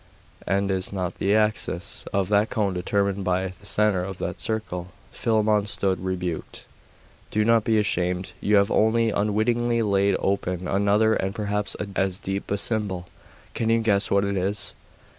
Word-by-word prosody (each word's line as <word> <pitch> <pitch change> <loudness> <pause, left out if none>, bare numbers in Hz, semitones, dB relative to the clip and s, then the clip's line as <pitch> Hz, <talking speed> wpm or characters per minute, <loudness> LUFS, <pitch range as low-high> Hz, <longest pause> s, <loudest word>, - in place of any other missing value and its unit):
And 100 +1 +1
is 95 -1 -2
not 95 -2 -3
the 100 +2 +2
axis 105 -4 0
of 100 -2 +1
that 105 +1 +3
cone 100 -3 0
determined 100 +2 0
by 95 0 0
the 95 +3 -9
centre 105 -4 +2
of 95 0 -5
that - - -4
circle?' 105 -5 -3 0.2
Philammon 110 -2 +1
stood 95 -3 -1
rebuked. 90 -3 -4 0.6
'Do 105 0 +1
not 115 -1 +4
be 110 0 +2
ashamed; 90 -3 0
you 105 - +3
have 100 0 +4
only, 115 +1 +3
unwittingly, 115 +3 +1
laid 100 -1 +2
open 90 -2 -1
another, 100 +3 +3
and 95 -1 -1
perhaps, 105 -1 -2 0.2
as 95 -1 0
deep 95 0 -4
a 100 - 0
symbol. 100 -5 -1 0.4
Can 115 - -1
you 115 0 +3
guess 100 -3 +2
what 100 0 +3
it 100 0 -1
is? 100 +3 -2
100 Hz, 160 wpm, -25 LUFS, 95-105 Hz, 0.6 s, not